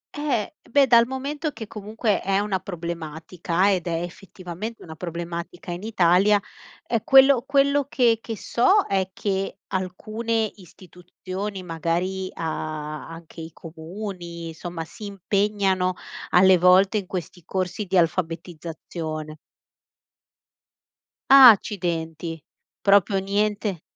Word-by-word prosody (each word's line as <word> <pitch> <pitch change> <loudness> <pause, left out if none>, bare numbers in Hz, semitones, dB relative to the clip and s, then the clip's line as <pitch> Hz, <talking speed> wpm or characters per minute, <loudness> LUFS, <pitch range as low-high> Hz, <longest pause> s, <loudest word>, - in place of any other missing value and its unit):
Eh, 285 -8 -1 0.2
beh, 280 +2 +5
dal 235 -1 +5
momento 285 +4 -3
che 235 -5 -8
comunque 215 0 -2
è 195 0 +1
una 200 -2 0
problematica 170 +1 -2
ed 180 -2 -2
è, 170 0 -1
effettivamente, 185 +3 -8
una 160 - -9
problematica 170 +1 -6
in 175 +2 -5
Italia. 205 -1 +3 0.5
Ehm, 230 -1 0
quello 270 -1 +6
quello 280 0 +3
che 235 -5 +3
che 225 -2 -6
so 380 - +3
è 190 -1 0
che 195 0 -3 0.2
alcune 215 +4 -2
istituzioni 185 +2 -8
magari 175 +3 -2
a 155 -2 -4
anche 165 0 -11
i 160 0 -8
comuni, 170 +1 -8
insomma, 165 0 -6
si 210 - -11
impegnano 195 -1 0 0.3
alle 185 0 +6
volte 185 +4 +5
in 195 - -9
questi 180 -1 -6
corsi 185 +4 -3
di 190 0 0
alfabetizzazione. 165 -2 -3 1.9
Ah, 270 -2 +11
accidenti, 165 -5 -3 0.4
proprio 200 -1 +4
niente. 200 -2 -1
185 Hz, 115 wpm, -24 LUFS, 170-210 Hz, 1.9 s, Ah